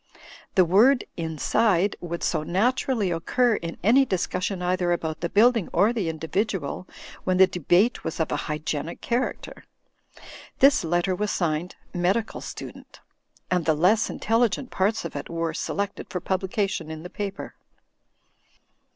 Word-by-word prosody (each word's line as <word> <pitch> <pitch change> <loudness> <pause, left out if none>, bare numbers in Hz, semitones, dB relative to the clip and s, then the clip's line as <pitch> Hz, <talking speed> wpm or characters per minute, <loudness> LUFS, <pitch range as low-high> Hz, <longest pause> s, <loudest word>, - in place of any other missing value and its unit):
The 185 -3 +6
word 230 +10 +5
"inside" 170 +4 +1
would 170 -1 -5
so - - 0
naturally 220 - 0
occur 230 +9 +1
in 170 0 -6
any 245 +7 +6
discussion 185 -3 -2
either 180 0 0
about 160 -2 -2
the 170 - -1
building 230 0 +3
or 205 +7 +3
the 205 -8 -1
individual, 165 +1 -2 0.4
when 185 -1 +1
the 190 - +8
debate 180 - +1
was 165 - -4
of 160 - 0
a - - +1
hygienic 150 +1 -3
character. 245 +2 -3 0.9
This 275 -5 +5
letter 175 +3 +1
was 210 +3 -1
signed 170 -1 -1 0.2
"Medical 190 +6 0
Student," - - -9 0.5
and 180 -3 +1
the 160 - +3
less 195 +9 +3
in - - -5
telligent 235 +3 +1
parts 205 +3 0
of - - -6
it - - -5
were 165 -1 -2
selected 200 +4 -3
for 180 - -3
publication 190 -1 -2
in 160 0 -7
the 180 - -7
piper. 200 -1 -5
185 Hz, 145 wpm, -25 LUFS, 170-215 Hz, 0.9 s, the